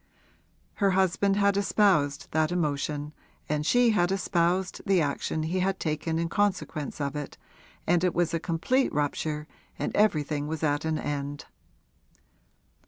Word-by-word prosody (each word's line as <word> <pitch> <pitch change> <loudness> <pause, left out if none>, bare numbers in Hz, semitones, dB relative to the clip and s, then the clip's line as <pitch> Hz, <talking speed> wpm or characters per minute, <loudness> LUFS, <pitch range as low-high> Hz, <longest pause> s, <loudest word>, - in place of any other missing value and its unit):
Her 200 - +5
husband 190 +1 +2
had 200 -1 +3
espoused 185 -8 +2
that 155 +1 +1
emotion 150 -3 -2 0.3
and 150 0 -1
she 240 +8 +4
had 175 -4 +2
espoused 185 -1 0
the 195 -2 +3
action 155 +1 -1
he 175 +4 -1
had 190 +1 0
taken 160 +1 -2
in 165 0 0
consequence 185 -7 -1
of 140 0 -2
it, 145 -2 -6 0.5
and 175 +1 +2
it 180 - +1
was 175 -1 +1
a 165 - +1
complete 180 +12 0
rupture 150 +1 -2 0.3
and - - -3
everything 150 -8 +1
was 160 0 -4
at 145 0 +1
an 160 -1 0
end. 145 -1 -4
165 Hz, 145 wpm, -27 LUFS, 150-190 Hz, 0.5 s, Her